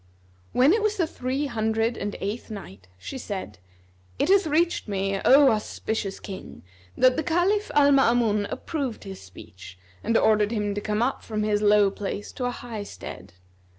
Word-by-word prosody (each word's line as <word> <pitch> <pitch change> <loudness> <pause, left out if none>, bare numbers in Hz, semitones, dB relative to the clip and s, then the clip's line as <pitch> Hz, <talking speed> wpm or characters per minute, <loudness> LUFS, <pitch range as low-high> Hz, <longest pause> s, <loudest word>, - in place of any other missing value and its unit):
When 265 +7 +5
it 445 - +2
was 425 0 0
the 345 - +2
Three 265 -1 -3
Hundred 225 -2 0
and 205 0 -4
Eighth 210 +5 -4
Night, 100 - -9
She 265 - -7
said, 190 - -6 0.6
It - - 0
hath 395 -3 +4
reached 330 0 +1
me, 195 -1 -1
O 275 0 +7
auspicious 215 -2 -3
King, 190 -2 -9 0.3
that 255 +1 +4
the 315 - 0
Caliph 370 +5 +1
Al 285 -1 +6
Maamun 235 -6 +3
approved 275 -8 -4
his 195 -1 -8
speech 95 0 -13 0.3
and 230 0 +2
ordered 215 -1 +3
him 210 -3 -1
to 205 - -3
come 210 +2 0
up 260 - -1
from 215 -1 -3
his 210 -1 +1
low 205 -1 +5
place 200 +1 -5
to 250 - -4
a - - +1
high 240 -3 -6
stead. 200 - -9
220 Hz, 175 wpm, -25 LUFS, 205-275 Hz, 0.6 s, O